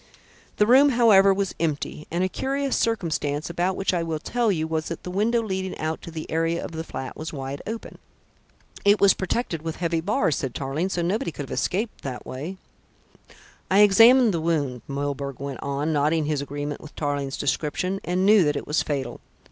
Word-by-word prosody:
The 210 - +4
room, 265 +5 +6
however, 220 -6 +6
was 195 -1 -1
empty, 155 -1 -2
and 175 +2 0
a - - +2
curious 275 +6 -1
circumstance, 160 -8 -1
about 180 +2 0
which 195 0 0
I 175 - +1
will 165 -1 -2
tell 235 +7 0
you, 160 -4 -1
was 160 -1 -2
that 165 - -6
the 180 - -5
window 225 +5 +1
leading 190 -3 -3
out 155 +1 -3
to - - -9
the 160 -1 -6
area 165 +1 0
of - - -7
the 160 0 -5
flat 130 -5 -6
was 155 - -6
wide 135 -1 -5
open." 225 +1 -6 0.8
"It 205 +1 +5
was 200 -1 +6
protected 190 -4 -2
with 160 0 -4
heavy 165 -2 -1
bars," 195 - +1
said 135 -3 -4
Tarling, 140 +7 -2
"so 175 -2 -1
nobody 195 +4 -1
could 145 - -6
have 135 - -10
escaped 210 +5 -2
that 130 -3 -6
way." 155 +9 -6 1.1
"I 195 +2 +5
examined 225 +3 +7
the 165 - -1
wound," 145 -7 -1
Milburgh 140 -1 -3
went 140 -2 -5
on, 140 +3 -1
nodding 150 +2 +2
his 150 -2 -1
agreement 145 +1 -5
with 155 - -12
Tarling's 145 -2 -2
description, 155 +7 -1
"and 180 +2 0
knew 210 -1 +6
that 145 - +1
it - - -4
was 150 - +1
fatal. 140 -4 -3
165 Hz, 195 wpm, -24 LUFS, 145-195 Hz, 1.1 s, examined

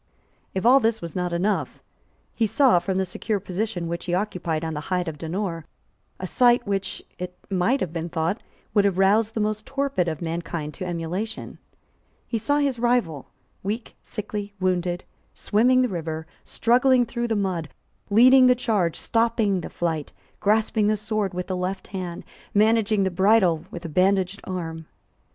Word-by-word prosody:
If 190 - -1
all 260 +3 +7
this 225 -2 +1
was 170 -2 -7
not 180 -1 -1
enough, 190 +5 -1 0.5
he 225 - +1
saw, 225 -3 +4
from 190 +1 -2
the 190 - +1
secure 200 +3 -2
position 185 -2 -3
which 170 +1 -4
he 175 -1 0
occupied 175 -5 -2
on 160 - -3
the 150 - -3
height 180 -1 0
of 155 -2 -5
Donore, 165 0 -3 0.5
a 185 - -4
sight 240 +4 +4
which, 195 -2 -3 0.2
it 180 0 -6
might 195 +9 +2
have 170 -3 -2
been 170 0 -3
thought, 165 +6 -1 0.3
would 205 - +4
have 195 -2 +1
roused 210 +3 +3
the - - 0
most 215 0 -1
torpid 275 -10 0
of 160 -2 -2
mankind 165 -2 -4
to 185 - -6
emulation. 180 +6 -4 0.7
He 230 - -2
saw 285 +7 +1
his 280 -4 0
rival, 235 - +1 0.3
weak, 215 +4 -4
sickly, 205 -1 -5
wounded, 180 -1 0 0.3
swimming 255 +5 +3
the - - +2
river, 160 -5 -4 0.2
struggling 245 +1 +3
through 235 +1 -3
the 225 - 0
mud, 185 -6 -1 0.4
leading 255 +5 +7
the 250 - +6
charge, 210 -9 0
stopping 225 -5 +1
the - - -6
flight, 160 -4 -3 0.3
grasping 215 0 +2
the 215 0 +2
sword 210 -3 -2
with 180 0 -2
the 185 - -3
left 185 +1 -3
hand, 180 -3 -5 0.3
managing 215 -1 +3
the 190 - 0
bridle 190 -3 +3
with 175 0 -8
a - - -2
bandaged 190 +3 +1
arm. 165 -3 -5
195 Hz, 170 wpm, -24 LUFS, 175-225 Hz, 0.7 s, all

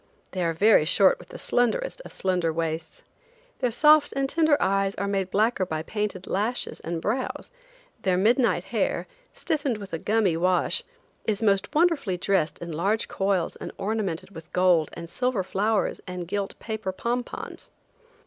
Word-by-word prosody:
They 185 -1 -2
are 165 -1 +1
very 205 -1 +5
short 185 +4 +4
with - - -14
the - - -8
slenderest 485 - 0
of - - -11
slender 180 -3 0
waists. 160 0 -3 0.6
Their 250 - +1
soft 300 +5 +5
and 275 0 +1
tender 315 0 +3
eyes 195 0 +1
are 200 - -2
made 195 -2 -1
blacker 215 +1 +2
by 160 -3 -3
painted 210 -2 -3
lashes 220 +6 -1
and 165 0 -4
brows; 240 - -3 0.5
their 185 -2 +2
midnight 235 +6 +3
hair, - - -1 0.3
stiffened 290 -8 -1
with 200 -3 -10
a 165 - -2
gummy 210 -4 +2
wash, 180 +2 +1 0.4
is 215 0 0
most 200 +6 +1
wonderfully 300 - +2
dressed 175 -4 +1
in 170 0 -7
large 195 +8 0
coils 195 -3 0
and - - -6
ornamented 195 -4 -2
with 165 -1 -11
gold 180 -4 +4
and 170 0 -7
silver 250 +2 -1
flowers 205 +3 0
and 180 -1 -5
gilt 200 +1 -3
paper 220 -4 -4
pom 235 +6 -1
pons. - - -7
195 Hz, 165 wpm, -26 LUFS, 180-230 Hz, 0.6 s, very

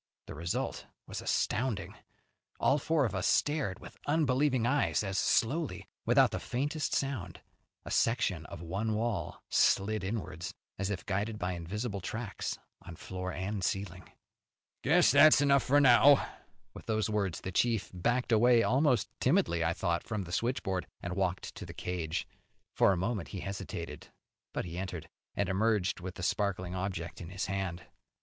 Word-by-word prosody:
The - - -8
result 85 +4 -3 0.2
was - - -6
astounding. 100 -7 -1 0.7
All 140 +2 +3
four 155 -1 +2
of 110 - -2
us 95 -1 0
stared 145 - +1
with - - -13
unbelieving 140 -4 +2
eyes 145 -3 +2
as 95 -1 -1
slowly, 145 - +1 0.2
without - - +5
the - - -2
faintest 145 +4 -2
sound, 120 -12 -2 0.5
a - - -6
section 100 -8 +1
of 85 - -8
one 100 +6 -1
wall 105 -8 -2
slid 105 +1 +2
inwards, 95 -5 -4 0.2
as 100 0 -1
if 95 -3 -4
guided 105 +3 -1
by 90 -2 -2
invisible 100 +5 -4
tracks 110 +3 -4 0.2
on 85 - -10
floor 90 +2 -5
and 95 +2 -3
ceiling. 95 -1 -3 0.7
"Guess 160 +4 +5
that's 145 +2 +8
enough 140 -1 +4
for 145 +4 +4
now." 140 +1 +7 0.5
With - - -11
the 110 -1 +1
words 100 -6 -1
the 95 - -4
chief 115 +3 +1
backed 120 +7 0
away, 115 +1 +5
almost 130 -2 +3
timidly, 85 0 +2
I 80 +1 +1
thought, 85 -2 -1
from 105 -3 -3
the 85 - -9
switchboard, 95 -5 -1 0.2
and 85 +1 -3
walked 95 -1 -1
to - - -8
the - - -9
cage. 85 -3 -3 0.5
For - - +4
a 95 - +1
moment 95 +1 -2
he 95 - -6
hesitated, 90 -5 -6 0.4
but - - -3
he 85 +1 -5
entered, 90 -4 -5 0.3
and 100 - 0
emerged 100 0 +1
with 90 0 -6
the 95 - -7
sparkling 95 -2 -1
object 90 -3 -4
in 85 - -7
his 95 0 -3
hand. 95 -3 -3
100 Hz, 160 wpm, -31 LUFS, 90-120 Hz, 0.7 s, that's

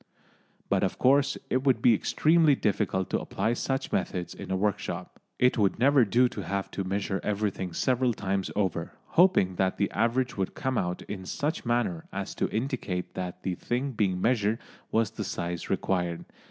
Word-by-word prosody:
But 100 -1 +2
of 95 - 0
course 140 +2 +3
it 130 +1 +1
would 130 -4 +3
be 120 0 +5
extremely 155 +6 +4
difficult 100 -5 0
to - - +1
apply 115 - -1
such 135 +2 -2
methods 90 -2 -2
in - - -9
a 95 - 0
workshop. 100 +1 -2 0.2
It 125 -1 +3
would 100 -2 +2
never 135 0 +5
do 120 +5 +4
to 105 - -6
have 100 +2 -3
to 100 - -3
measure 95 +1 -1
everything 100 -3 -1
several 125 +7 +1
times 100 -3 -2
over, 95 -4 -1 0.2
hoping 165 - +4
that 95 -1 +1
the 100 - 0
average 120 +3 0
would 95 -1 -2
come 130 -2 -1
out 90 0 -2
in 95 -2 -7
such 145 -3 -2
manner 120 -9 0
as 100 0 -4
to - - -1
indicate 110 -7 -3
that 90 -1 -5
the 95 - -1
thing 125 +9 -2
being 100 -6 0
measured 110 0 +2 0.3
was 110 -1 +2
the 110 - -4
size 85 -3 -4
required. 90 -3 -1
105 Hz, 180 wpm, -28 LUFS, 95-125 Hz, 0.3 s, be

